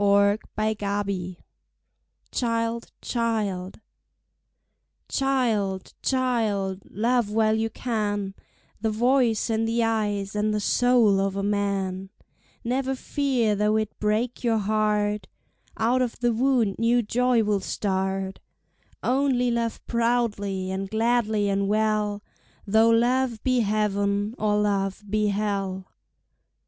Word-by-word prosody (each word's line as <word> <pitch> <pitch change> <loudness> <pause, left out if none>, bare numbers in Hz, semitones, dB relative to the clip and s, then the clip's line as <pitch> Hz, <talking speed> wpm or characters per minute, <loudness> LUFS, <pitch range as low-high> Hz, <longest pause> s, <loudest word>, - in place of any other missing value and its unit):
Child, 200 +1 +4 1.9
Child 230 -1 -1
Child, 215 -5 -2 2.4
child, 205 -6 0
love 235 +1 +1
while 215 0 +2
you 220 +1 0
can 205 -5 -2 0.5
The 220 - +1
voice 235 0 +2
and 225 0 +1
the 230 +1 +1
eyes 210 -3 -1
and 210 +1 +1
the - - 0
soul 235 -2 +3
of 195 0 0
a 200 - -2
man; 195 -2 -1 0.5
Never 265 +2 -1
fear 260 -5 0
though 210 +1 +2
it 215 -1 -3
break 220 +4 -1
your 230 -2 +2
heart 210 -1 0 0.5
Out 240 +3 +2
of 245 -2 -1
the 240 -1 +2
wound 240 -4 +1
new 235 +1 +3
joy 245 +1 +2
will 210 -1 +1
start; 190 -1 -2 0.6
Only 255 -2 +2
love 235 -1 -2
proudly 215 -5 0
and 190 0 -3
gladly 220 -2 +1
and 200 0 0
well, 210 -1 0 0.4
Though 220 +2 +4
love 240 0 +2
be 255 -1 +2
heaven 205 -1 0
or 210 -1 +2
love 200 -1 0
be 210 +1 +1
hell. 195 -2 -2
215 Hz, 110 wpm, -25 LUFS, 200-235 Hz, 2.4 s, Child